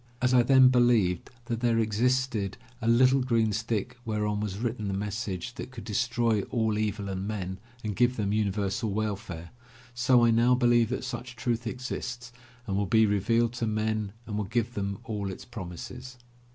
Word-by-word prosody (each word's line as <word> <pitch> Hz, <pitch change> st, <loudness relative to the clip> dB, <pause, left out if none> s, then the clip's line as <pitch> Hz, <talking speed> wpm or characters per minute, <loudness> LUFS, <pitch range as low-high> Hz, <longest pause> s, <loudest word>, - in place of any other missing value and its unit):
As 125 Hz, 0 st, +2 dB
I 125 Hz, -, +7 dB
then 130 Hz, +1 st, +6 dB
believed 120 Hz, -8 st, +3 dB, 0.2 s
that 115 Hz, -1 st, -2 dB
there 120 Hz, -1 st, +2 dB
ex 110 Hz, -2 st, -1 dB
isted 125 Hz, -5 st, +1 dB, 0.3 s
a 115 Hz, -, -2 dB
little 130 Hz, +3 st, +5 dB
green 115 Hz, -4 st, +2 dB
stick 115 Hz, +1 st, -2 dB
whereon 105 Hz, -2 st, -1 dB
was 105 Hz, -2 st, -3 dB
written 115 Hz, -2 st, -2 dB
the 95 Hz, -, -1 dB
message 105 Hz, 0 st, -3 dB
that -, -, -7 dB
could 130 Hz, -3 st, -9 dB
destroy 115 Hz, 0 st, +1 dB
all 110 Hz, -3 st, +1 dB
evil 105 Hz, -1 st, -2 dB
in 95 Hz, 0 st, -3 dB
men 95 Hz, -3 st, -4 dB, 0.2 s
and 105 Hz, -2 st, -3 dB
give 125 Hz, +3 st, +3 dB
them 100 Hz, -2 st, 0 dB
universal 105 Hz, +1 st, 0 dB
welfare, 100 Hz, -5 st, -4 dB, 0.4 s
so 120 Hz, 0 st, +4 dB
I 115 Hz, -, +4 dB
now 120 Hz, +2 st, +4 dB
believe 120 Hz, -2 st, +3 dB
that 130 Hz, -, -3 dB
such 125 Hz, -1 st, -6 dB
truth 120 Hz, 0 st, -2 dB
exists 120 Hz, -1 st, -5 dB, 0.3 s
and 100 Hz, -5 st, -2 dB
will 100 Hz, 0 st, 0 dB
be 110 Hz, +2 st, +5 dB
revealed 115 Hz, +3 st, +2 dB
to 120 Hz, -2 st, -2 dB
men 110 Hz, -1 st, -1 dB
and 105 Hz, -, -5 dB
will 105 Hz, -, -1 dB
give 120 Hz, +3 st, -1 dB
them 100 Hz, -2 st, -3 dB
all 105 Hz, -3 st, -3 dB
it 95 Hz, -, -8 dB
promises. 125 Hz, +5 st, -8 dB
110 Hz, 180 wpm, -28 LUFS, 105-120 Hz, 0.4 s, I